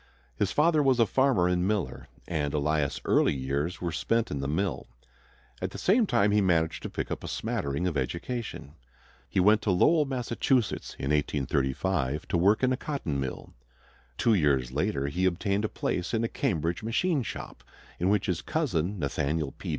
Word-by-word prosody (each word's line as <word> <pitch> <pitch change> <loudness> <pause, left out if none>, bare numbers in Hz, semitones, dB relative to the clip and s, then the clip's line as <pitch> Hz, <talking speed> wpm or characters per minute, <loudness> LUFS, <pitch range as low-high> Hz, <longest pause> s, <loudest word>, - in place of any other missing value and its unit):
His 95 +9 0
father 155 0 +3
was 135 -3 +3
a 115 - +6
farmer 130 -7 +2
and 90 0 +1
miller, 105 -3 -2 0.2
and 75 -3 -1
Elias' 75 -1 0
early - - +3
years 70 +6 -2
were 85 -1 -2
spent 115 +7 0
in 70 - -2
the 70 - -2
mill. 80 -2 -1 0.7
At - - -1
the - - -9
same 215 +4 +3
time 100 - +3
he 105 0 +3
managed 85 -4 +1
to - - -5
pick - - -4
up - - -4
a - - -5
smattering 70 +5 -2
of 90 -4 -1
education. 85 - -4 0.6
He 95 - 0
went 105 +4 +5
to - - -2
Lowell, 150 - +4
Massachusetts, 125 -2 -1
in 70 - -2
1835, 75 +1 0
to - - 0
work 100 +7 +3
in 130 0 +3
a - - -1
cotton 125 - -3
mill. 65 -1 -5 0.6
Two 115 - +3
years 70 - +2
later 75 0 -1
he 90 +7 -1
obtained 100 +3 0
a - - -2
place 90 +5 -2
in 115 - 0
a - - +1
Cambridge 85 - -1
machine 140 +8 +1
shop, 115 - -7 0.4
in 90 - +1
which 105 -2 +2
his 90 -1 -1
cousin, 105 - -1
Nathaniel 75 -1 -1
P. - - -8
90 Hz, 180 wpm, -28 LUFS, 75-115 Hz, 0.7 s, a